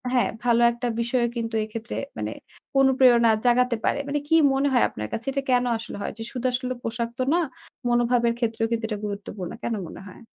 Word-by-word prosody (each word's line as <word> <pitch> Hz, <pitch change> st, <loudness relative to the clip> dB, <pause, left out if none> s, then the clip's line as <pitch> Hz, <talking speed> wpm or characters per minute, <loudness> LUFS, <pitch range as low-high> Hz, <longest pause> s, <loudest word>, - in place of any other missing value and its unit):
হ্যাঁ, 245 Hz, -, +3 dB, 0.2 s
ভালো 235 Hz, -1 st, +4 dB
একটা 240 Hz, +1 st, -3 dB
বিষয়ও 235 Hz, 0 st, +1 dB
কিন্তু 225 Hz, -1 st, -3 dB
এক্ষেত্রে 225 Hz, +2 st, -6 dB, 0.2 s
মানে -, -, -3 dB, 0.5 s
অনুপ্রেরণা 255 Hz, -4 st, +5 dB
জাগাতে 245 Hz, 0 st, +3 dB
পারে। -, -, +1 dB
মানে 290 Hz, +1 st, 0 dB
কি 325 Hz, -, +3 dB, 0.2 s
মনে 270 Hz, +1 st, +2 dB
হয় 245 Hz, -, +4 dB
আপনার 105 Hz, 0 st, -5 dB
কাছে 230 Hz, -, -4 dB
এটা 275 Hz, +1 st, -1 dB
কেন 250 Hz, 0 st, +3 dB
আসলে 225 Hz, -, -7 dB
হয়? -, -, -3 dB
যে -, -, -4 dB
শুধু 255 Hz, -1 st, -5 dB
আসলে 255 Hz, 0 st, -1 dB
পোশাক 230 Hz, 0 st, -2 dB
তো -, -, +2 dB
না, 345 Hz, -, +3 dB, 0.5 s
মনোভাবের 240 Hz, 0 st, +3 dB
ক্ষেত্রেও 225 Hz, -1 st, 0 dB
কিন্তু 230 Hz, -1 st, -1 dB
এটা 210 Hz, -, -2 dB
গুরুত্বপূর্ণ। 200 Hz, -3 st, -5 dB
কেন 235 Hz, -, -1 dB
মনে -, -, -10 dB
হয়? 185 Hz, -, -13 dB
235 Hz, 195 wpm, -25 LUFS, 225-250 Hz, 0.5 s, অনুপ্রেরণা